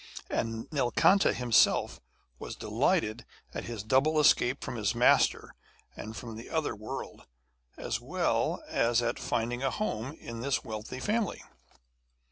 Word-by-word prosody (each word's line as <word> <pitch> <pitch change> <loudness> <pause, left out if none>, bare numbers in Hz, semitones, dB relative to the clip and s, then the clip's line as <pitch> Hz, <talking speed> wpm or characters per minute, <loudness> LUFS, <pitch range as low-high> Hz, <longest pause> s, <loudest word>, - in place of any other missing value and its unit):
And 115 0 -2
Nilkanta 150 +8 +4
himself 120 -3 +3 0.4
was - - -6
delighted 110 +2 0 0.3
at - - -5
his 115 -4 -5
double 135 +7 +3
escape 140 -3 +3
from 130 - -5
his 105 0 0
master 120 +1 +3 0.4
and 110 +1 -8
from 115 0 -7
the 115 - -10
other 160 -7 -1
world, 110 +1 -7 0.5
as - - -3
well - - 0
as 120 0 +2
at 120 - -1
finding 120 +2 -2
a 135 - +1
home 130 - -3
in 115 -1 -7
this 135 +1 0
wealthy 110 +2 -6
family. 210 - -1
120 Hz, 135 wpm, -30 LUFS, 115-135 Hz, 0.5 s, Nilkanta